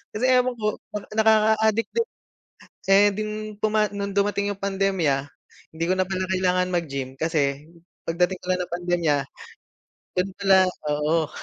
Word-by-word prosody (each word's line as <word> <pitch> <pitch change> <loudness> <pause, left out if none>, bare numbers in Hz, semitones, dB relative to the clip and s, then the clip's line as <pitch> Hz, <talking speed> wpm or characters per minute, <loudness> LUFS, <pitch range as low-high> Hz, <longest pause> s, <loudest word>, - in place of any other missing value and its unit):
Kasi 215 - -3
ewan 250 0 +3
ko 215 - -5 0.2
para 210 -1 -6
nakakaadik 220 0 +3
din. 465 0 0 0.8
Saya 195 +1 +5
ding 215 +1 -3 0.3
tuma 215 0 +2
no'ng 200 0 -3
dumating 200 0 0
'yong 200 - -7
pandemya, 190 -7 +1 0.6
hindi 160 +1 -4
ko 185 - +2
na 185 - +2
pala 185 0 -3
kailangan 180 -1 +1
mag-gym 140 -6 -3
kasi 145 -1 -1 0.3
pagdating 180 +2 0
pala 185 0 +1
ng 180 -1 -4
pandemya, 175 -3 +1 1.0
do'n 180 +2 +1
pala, 195 -1 +5 0.3
oo. 150 +2 +1
190 Hz, 140 wpm, -24 LUFS, 165-210 Hz, 1.0 s, Saya